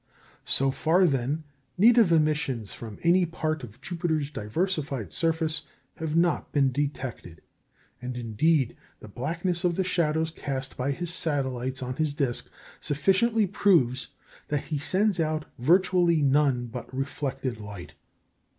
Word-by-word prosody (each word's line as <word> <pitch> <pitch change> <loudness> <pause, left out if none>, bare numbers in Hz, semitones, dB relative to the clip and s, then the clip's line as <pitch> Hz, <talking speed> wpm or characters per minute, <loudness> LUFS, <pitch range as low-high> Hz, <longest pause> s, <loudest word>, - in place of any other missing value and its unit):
So 135 0 +2
far, 170 +7 +3
then, 140 +1 0 0.3
native 225 -1 +6
emissions 150 -8 +1
from 110 -3 -8
any 175 +2 +5
part 155 -2 -2
of 120 +1 -10
Jupiter's 160 -3 -2
diversified 140 - -2
surface 160 -2 0 0.3
have 160 -2 -3
not 170 -1 +1
been 135 -2 +3
detected; 130 - -4 0.6
and, 125 0 -5
indeed, 125 +4 +1 0.2
the - - -11
blackness 170 - -2
of 175 -1 +2
the 190 - +1
shadows 160 -3 0
cast 135 -4 -4
by 130 +2 -2
his 170 +4 -2
satellites 130 -5 -2
on 125 0 -4
his 155 -2 0
disc 135 -5 -1 0.3
sufficiently 195 +10 +2
proves 170 -10 +2 0.4
that 145 -1 -1
he 150 0 -3
sends 190 +5 +2
out 155 -1 0
virtually 175 +3 +4
none 135 -3 +3
but 120 +1 -8
reflected 135 -2 -3
light. 105 -4 -9
150 Hz, 130 wpm, -27 LUFS, 130-170 Hz, 0.6 s, native